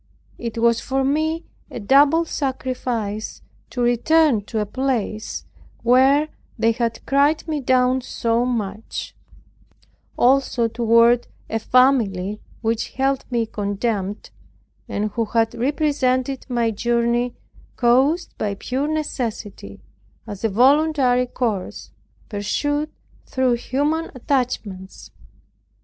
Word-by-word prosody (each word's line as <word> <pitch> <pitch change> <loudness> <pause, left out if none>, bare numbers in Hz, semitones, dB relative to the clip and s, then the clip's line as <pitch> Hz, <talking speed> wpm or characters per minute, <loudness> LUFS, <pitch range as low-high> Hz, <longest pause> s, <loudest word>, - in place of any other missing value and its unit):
It 235 -1 -5
was 235 0 +3
for 270 0 -1
me 315 +4 0 0.3
a - - -6
double 285 +9 +4
sacrifice 250 -7 -3 0.3
to 250 - -4
return 245 0 +3
to 225 - -5
a 210 - +1
place 225 -2 -2 0.4
where 265 +5 +4 0.3
they 225 0 +3
had 230 0 -2
cried 285 +4 +2
me 310 -2 -1
down 255 0 +2
so 230 -1 0
much; 220 -4 -4 1.0
also 255 -2 +3
toward 230 +1 +3 0.2
a 225 - 0
family 215 -6 +2 0.2
which 225 0 -1
held 270 0 0
me 240 -2 0
in - - 0
contempt, 205 0 -3 0.6
and 210 +1 -2
who 230 +2 -1
had 225 +1 +1
represented 265 0 0
my 235 -2 +1
journey, 235 +2 0 0.4
caused 265 +8 +2
by 205 -2 -1
pure 260 +7 -2
necessity, 230 - -4 0.4
as 205 -2 -8
a 225 - +2
voluntary 260 +2 +3
course, 225 -6 -3 0.4
pursued 290 +9 -1 0.4
through 260 -1 +1
human 290 +7 -1
attachments. 230 -8 -3
245 Hz, 110 wpm, -21 LUFS, 225-270 Hz, 1.0 s, double